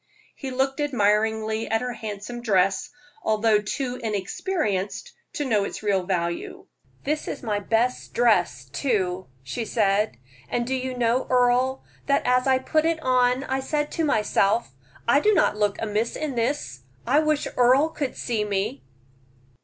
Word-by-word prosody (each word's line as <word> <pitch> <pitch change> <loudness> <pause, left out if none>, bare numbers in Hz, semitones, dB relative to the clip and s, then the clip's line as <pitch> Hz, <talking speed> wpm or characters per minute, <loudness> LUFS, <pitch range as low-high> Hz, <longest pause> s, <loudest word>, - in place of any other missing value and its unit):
He 270 - -6
looked 265 +2 -1
admiringly 220 -4 +1
at 225 0 +1
her 250 -1 -3
handsome 220 +1 -6
dress, 195 -4 +2 0.3
although 215 0 +3
too 250 +4 -3
inexperienced 210 - -2 0.2
to 295 - -2
know 215 -6 +2
its 200 - -5
real 195 -3 +1
value. 170 -2 -2 0.4
"This 300 +2 -2
is - - -5
my 210 -3 -1
best 230 +4 0
dress, 175 - +2
too," 185 - -1 0.2
she 230 - -4
said. 210 - +1 0.3
"And 240 0 -1
do 260 - -2
you 260 -1 -3
know, 240 +1 +1
Earle, 250 +1 +2 0.2
that 280 -1 +2
as 250 +1 +3
I 260 -1 +5
put 310 +4 +1
it 330 -1 +1
on 255 0 +3
I 265 -1 -1
said 295 +2 -2
to 330 - -1
myself, 215 - +2 0.4
I 240 +4 +5
do 420 +6 +3
not - - +3
look 210 -1 0
amiss 220 +1 -1
in 305 -3 -3
this; 235 - -2 0.3
I 280 +5 +4
wish 305 -1 +1
Earle 255 +5 +4
could 290 -4 -4
see 225 -4 -1
me." 195 -9 -2
235 Hz, 155 wpm, -25 LUFS, 210-265 Hz, 0.4 s, I